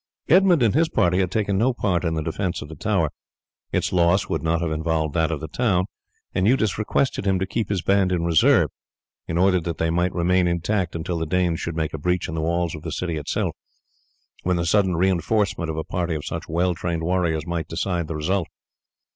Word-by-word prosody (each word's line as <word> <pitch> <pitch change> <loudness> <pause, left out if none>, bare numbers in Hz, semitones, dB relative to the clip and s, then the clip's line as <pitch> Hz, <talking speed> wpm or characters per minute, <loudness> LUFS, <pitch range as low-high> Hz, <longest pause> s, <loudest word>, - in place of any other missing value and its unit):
Edmund 180 -5 +5
and 110 - +3
his 160 +4 +3
party 90 +1 +2
had 95 -2 +1
taken 100 0 0
no 125 +4 +3
part 90 -6 0
in 80 -2 0
the 80 - -2
defence 85 +2 -2
of 75 - -11
the 80 - -8
tower. 85 -2 0 0.6
Its - - 0
loss 90 +2 +3
would 80 -4 -2
not 80 +1 +1
have 85 -1 -2
involved 80 -1 -1
that 80 -1 +1
of 80 -2 -3
the 80 - -5
town, 95 0 +1 0.5
and 95 +2 +1
Eudes 110 -5 +2
requested 105 0 0
him 95 -1 +3
to 95 - -1
keep 110 +2 -2
his 95 -4 -1
band 95 0 +3
in 85 -2 0
reserve 85 -2 +4 0.6
in 80 - -2
order 90 0 +4
that 85 -1 -4
they 80 0 0
might 90 +2 +1
remain 90 +1 +2
intact 85 +2 -1
until 85 +1 -3
the 80 - -2
Danes 90 -1 +1
should 85 - -4
make 80 -1 -2
a 80 - -4
breach 90 +3 0
in - - -5
the 80 - -2
walls 85 +1 0
of 75 - -7
the - - -5
city 85 -3 -2
itself, 75 -2 -2 0.9
when 90 0 +1
the 85 - -1
sudden 95 0 +2
reinforcement 95 0 +1
of 80 - -3
a 80 - -1
party 85 -1 -2
of 75 - -5
such - - -5
well 90 +3 +1
trained 85 -1 -3
warriors 85 -3 0
might 85 -1 -3
decide 85 0 -2
the 80 - -4
result. 85 +3 0
85 Hz, 220 wpm, -23 LUFS, 80-95 Hz, 0.9 s, Edmund